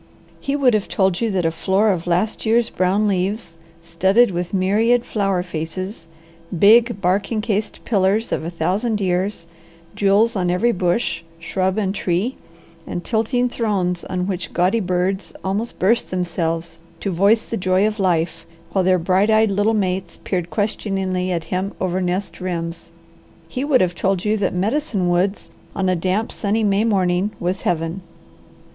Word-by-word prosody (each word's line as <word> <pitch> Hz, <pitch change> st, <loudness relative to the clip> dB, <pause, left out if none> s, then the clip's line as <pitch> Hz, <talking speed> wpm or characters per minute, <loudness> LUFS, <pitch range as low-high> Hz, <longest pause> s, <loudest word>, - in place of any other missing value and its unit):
He 275 Hz, -, -2 dB
would 265 Hz, -4 st, +3 dB
have 210 Hz, -2 st, 0 dB
told 190 Hz, -1 st, +1 dB
you 230 Hz, -, +1 dB
that 185 Hz, -4 st, 0 dB
a 165 Hz, -, +2 dB
floor 190 Hz, +6 st, +2 dB
of 175 Hz, -2 st, -3 dB
last 180 Hz, +5 st, 0 dB
year's 230 Hz, +1 st, +2 dB
brown 190 Hz, +4 st, +1 dB
leaves, 190 Hz, -2 st, -2 dB, 0.2 s
studded 190 Hz, +8 st, +3 dB
with 175 Hz, 0 st, -3 dB
myriad 215 Hz, +6 st, +2 dB
flower 195 Hz, -4 st, 0 dB
faces, 170 Hz, +2 st, -5 dB, 0.5 s
big, 225 Hz, +3 st, +5 dB
bark 195 Hz, +4 st, +1 dB
encased 215 Hz, -2 st, -2 dB
pillars 205 Hz, +1 st, +1 dB
of -, -, -1 dB
a 165 Hz, -, -3 dB
thousand 195 Hz, +7 st, -1 dB
years, 185 Hz, -1 st, -1 dB, 0.5 s
jewels 205 Hz, +3 st, +3 dB
on 180 Hz, -2 st, 0 dB
every 180 Hz, +7 st, +2 dB
bush, 180 Hz, 0 st, 0 dB, 0.2 s
shrub, 185 Hz, +3 st, -1 dB
and 195 Hz, -3 st, 0 dB
tree, 195 Hz, +6 st, -1 dB, 0.5 s
and 175 Hz, -, -4 dB
tilting 245 Hz, +2 st, +1 dB
thrones 195 Hz, -7 st, -1 dB
on 180 Hz, -1 st, -2 dB
which 185 Hz, -2 st, -4 dB
gaudy 185 Hz, +6 st, +2 dB
birds 185 Hz, 0 st, -1 dB
almost 205 Hz, +5 st, -2 dB
burst 230 Hz, +6 st, +2 dB
themselves 165 Hz, -2 st, -2 dB, 0.2 s
to 195 Hz, -, -2 dB
voice 200 Hz, +6 st, +3 dB
the -, -, -5 dB
joy 185 Hz, 0 st, +2 dB
of 215 Hz, 0 st, -1 dB
life, 165 Hz, -3 st, 0 dB, 0.3 s
while 190 Hz, -, +1 dB
their 185 Hz, 0 st, +4 dB
bright 185 Hz, +4 st, +2 dB
eyed 220 Hz, -1 st, +4 dB
little 205 Hz, +3 st, +2 dB
mates 185 Hz, -3 st, -2 dB
peered 180 Hz, -3 st, -2 dB
questioningly 190 Hz, -3 st, -1 dB
at 170 Hz, -2 st, -1 dB
him 190 Hz, +2 st, -1 dB
over 185 Hz, 0 st, -1 dB
nest 185 Hz, +2 st, -2 dB
rims 170 Hz, -2 st, -4 dB, 0.6 s
he 250 Hz, +10 st, -4 dB
would 285 Hz, -3 st, +3 dB
have 180 Hz, -1 st, +1 dB
told 190 Hz, +1 st, -1 dB
you 210 Hz, +1 st, +2 dB
that 200 Hz, -3 st, 0 dB
Medicine 205 Hz, -, 0 dB
Woods 185 Hz, +3 st, 0 dB, 0.2 s
on 190 Hz, -, 0 dB
a 185 Hz, -, +2 dB
damp, 185 Hz, +6 st, -1 dB
sunny 215 Hz, +1 st, -1 dB
May 200 Hz, 0 st, +2 dB
morning 190 Hz, -2 st, +1 dB
was 180 Hz, +2 st, -2 dB
Heaven. 165 Hz, +2 st, -1 dB
190 Hz, 165 wpm, -20 LUFS, 180-215 Hz, 0.6 s, big